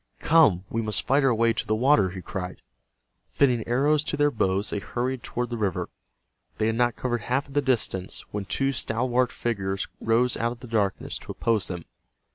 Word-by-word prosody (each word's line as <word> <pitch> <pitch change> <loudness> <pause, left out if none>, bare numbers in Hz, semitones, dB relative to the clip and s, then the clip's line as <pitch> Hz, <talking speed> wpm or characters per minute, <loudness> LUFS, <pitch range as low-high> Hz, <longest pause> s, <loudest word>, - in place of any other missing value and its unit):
"Come, 145 - +4
we 115 - -2
must 110 -2 0
fight 140 +2 +3
our 130 -3 +4
way 115 +1 +3
to - - -3
the 110 - +2
water!" 120 -5 +4
he 95 0 -8
cried. 90 -1 -6 0.7
Fitting 125 -5 +2
arrows 145 +5 +2
to - - -2
their 145 0 +3
bows 100 -2 0
they 105 - -1
hurried 125 +4 -3
toward 120 0 -3
the 120 - -2
river. 100 -5 -1 0.7
They 110 - +1
had 110 0 +1
not 120 0 +2
covered 120 -2 -2
half 130 +6 -1
of 140 - -13
the 145 - +3
distance, 115 -8 -1
when 105 -1 -3
two 135 +7 0
stalwart 125 0 0
figures 95 -4 -2
rose 115 +2 +2
out 115 +1 -1
of 120 - -16
the 125 - -9
darkness 105 -4 -1
to - - -8
oppose 115 -4 0
them. 90 -3 -5
115 Hz, 200 wpm, -26 LUFS, 105-130 Hz, 0.7 s, Come